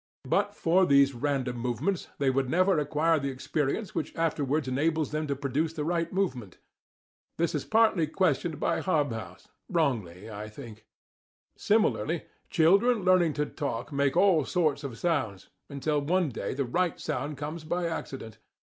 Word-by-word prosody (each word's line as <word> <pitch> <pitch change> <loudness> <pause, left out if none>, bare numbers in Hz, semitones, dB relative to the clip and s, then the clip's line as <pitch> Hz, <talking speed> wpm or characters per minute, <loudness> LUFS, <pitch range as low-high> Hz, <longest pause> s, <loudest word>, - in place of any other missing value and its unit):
But - - +1
for 180 +3 +3
these 140 0 +5
random 130 -1 -1
movements, 125 - -2
they 140 -2 +2
would 135 -1 0
never 185 +1 +3
acquire 150 +2 +2
the 140 -1 -2
experience 145 - -2
which 155 - -3
afterwards 150 -3 0
enables 155 +4 0
them 155 0 -2
to 140 - -1
produce 140 +4 -1
the 155 -3 -3
right 170 0 -1
movement. 130 - -2 0.8
(This 170 0 0
is 150 - -2
partly 220 -7 +3
questioned 165 -1 0
by - - 0
Hobhouse* 115 - -2 0.2
wrongly, 110 - -1
I 105 -1 -7
think.) 110 -2 -11 0.7
Similarly, 190 -6 +1 0.3
children 200 +7 +4
learning 180 -4 +4
to 150 +1 0
talk 140 -3 -4
make 140 +2 +1
all 180 -5 +5
sorts 155 -2 0
of 130 -5 -6
sounds, 110 - -1 0.2
until 145 +1 -1
one 175 +2 +1
day 125 - -4
the 140 0 -1
right 175 +8 0
sound 145 -1 -3
comes 155 +3 -5
by 175 +3 -2
accident. 130 -9 -6
150 Hz, 155 wpm, -28 LUFS, 130-170 Hz, 0.8 s, these